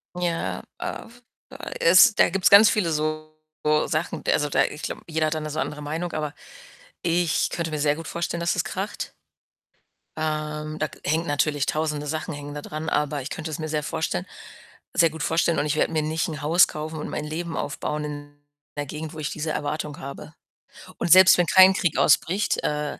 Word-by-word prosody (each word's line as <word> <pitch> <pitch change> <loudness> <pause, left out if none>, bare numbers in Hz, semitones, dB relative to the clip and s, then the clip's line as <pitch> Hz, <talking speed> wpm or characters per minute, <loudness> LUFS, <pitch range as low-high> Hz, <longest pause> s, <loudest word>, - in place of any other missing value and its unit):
Ja, 175 -2 -2 0.2
äh, - - -5
f 245 +2 -19 0.3
äh, - - -8
es 185 +5 +7
da - - +4
gibt's 195 +2 +2
ganz 205 +2 +9
viele 190 -6 +1
so 155 0 -2 0.6
Sachen. 160 0 -2
Also, 150 -1 +2
da - - +3
ich 150 - -7
glaube, - - -4
jeder 160 -1 0
hat 155 - -1
da 155 - -2
'ne 155 - -5
so 155 +1 -4
andere 150 -1 -3
Meinung, 160 +4 -4
aber 150 -1 -3 0.7
ich 175 -1 +1
könnte 165 -1 -3
mir 155 - -3
sehr 145 0 +2
gut 165 - -8
vorstellen, 170 0 -3
dass 170 0 0
es - - 0
kracht. - - -5 1.0
Ähm, 155 0 -3
da 155 - 0 0.2
hängt 160 +3 0
natürlich 145 -1 0
1.000e 150 -1 -2
Sachen 155 +2 -3
hängen 145 0 -7
da 145 - -6
dran, 155 +2 -6
aber 150 -1 0
ich 130 - -6
könnte 160 0 -5
es 155 - -5
mir 155 - -3
sehr 150 -1 -1
vorstellen 155 - -2 0.7
sehr 165 - +6
gut 160 -1 -5
vorstellen, 165 +1 +1
und - - 0
ich 150 - 0
werde 155 - +1
mir 155 - +1
nicht 160 +1 -1
'n 150 -3 -6
Haus 165 +4 +5
kaufen 155 +1 -6
und - - -5
mein 150 - -4
Leben 160 +2 -4
aufbauen 150 +1 -3
in 145 0 -9 0.3
'ner 145 - -2
Gegend, 155 +2 -6
wo - - -8
ich 150 - -3
diese 155 +1 -4
Erwartung 150 0 -3
habe. 140 -4 -9 0.6
Und 170 - -1
selbst 185 +1 +8
wenn 175 - +3
kein 190 +2 +7
Krieg 175 -4 0
ausbricht 180 +7 +2
äh, 150 -1 -2
155 Hz, 205 wpm, -24 LUFS, 150-165 Hz, 1.0 s, ganz